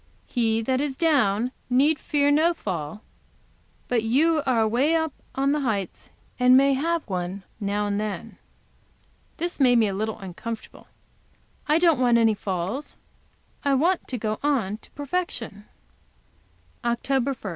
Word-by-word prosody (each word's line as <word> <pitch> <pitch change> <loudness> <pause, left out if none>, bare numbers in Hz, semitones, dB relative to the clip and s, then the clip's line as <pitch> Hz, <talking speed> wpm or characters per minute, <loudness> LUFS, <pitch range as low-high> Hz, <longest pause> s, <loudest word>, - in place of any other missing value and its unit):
'He 225 -2 0
that 260 +3 0
is 285 -2 -2
down 250 -8 +2 0.2
need 285 +5 +3
fear 285 -1 +1
no 325 +4 +3
fall'; 180 - -5 0.8
but 245 -2 +1
you 305 +8 +2
are 245 -3 +3
away 245 +9 +2
up 320 -3 0 0.2
on 275 +1 +1
the 300 - +1
heights, 215 -9 -3 0.3
and 250 +1 +6
may 275 +1 +4
have 330 +4 -1
one, 185 0 -4 0.2
now 205 0 -1
and 205 0 -1
then." 210 -2 -5 1.0
This 345 0 -3
made 250 -3 +5
me 225 -2 +4
a 195 - -2
little 215 +3 -2
uncomfortable. 215 +4 -8 0.8
I 300 - +4
don't 335 -5 +4
want 245 -2 +4
any 225 -1 +4
falls. 195 +7 -4 0.7
I 280 -2 +3
want 340 +7 +1
to 255 - -3
go 215 -1 -2
on 240 -9 0
to - - -19
perfection. 275 - -4 1.2
OCT. 240 +2 0
1. 275 +1 -1
250 Hz, 145 wpm, -25 LUFS, 215-290 Hz, 1.2 s, and